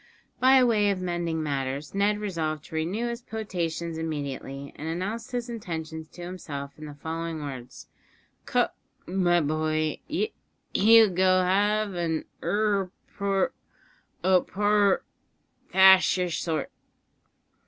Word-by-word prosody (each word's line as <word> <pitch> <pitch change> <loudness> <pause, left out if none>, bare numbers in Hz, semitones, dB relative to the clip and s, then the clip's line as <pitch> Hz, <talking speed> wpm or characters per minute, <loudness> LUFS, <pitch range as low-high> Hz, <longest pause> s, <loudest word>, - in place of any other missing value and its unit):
By 260 0 +6
way 215 -4 +3
of 195 -2 0
mending 175 -3 -2
matters, 140 0 -3
Ned 200 +1 +2
resolved 160 -7 -3
to - - -9
renew 185 +9 -1
his 235 0 -5
potations 170 -7 -3
immediately, 140 -3 -5
and 155 - -6
announced 205 +9 -3
his 245 -1 -2
intentions 160 -8 -5
to 175 +3 -11
himself 150 -6 -6
in 155 - -8
the 145 - -9
following 160 +1 -4
words: 130 -4 -8 0.6
"Com - - +2 0.4
mi 175 -1 +2
boy 155 +1 0
y 425 +8 -1 0.4
you'll 220 0 +7
go 185 +1 +4
ave 205 +1 +2
an 160 -2 -1 0.2
urrer 205 -2 +1 0.3
por 195 -1 0 0.7
o 185 -1 +5
porer 205 0 +2 0.7
thash 190 0 +7
yer 180 -1 0
sort!" 160 -2 -2
180 Hz, 125 wpm, -27 LUFS, 155-205 Hz, 0.7 s, you'll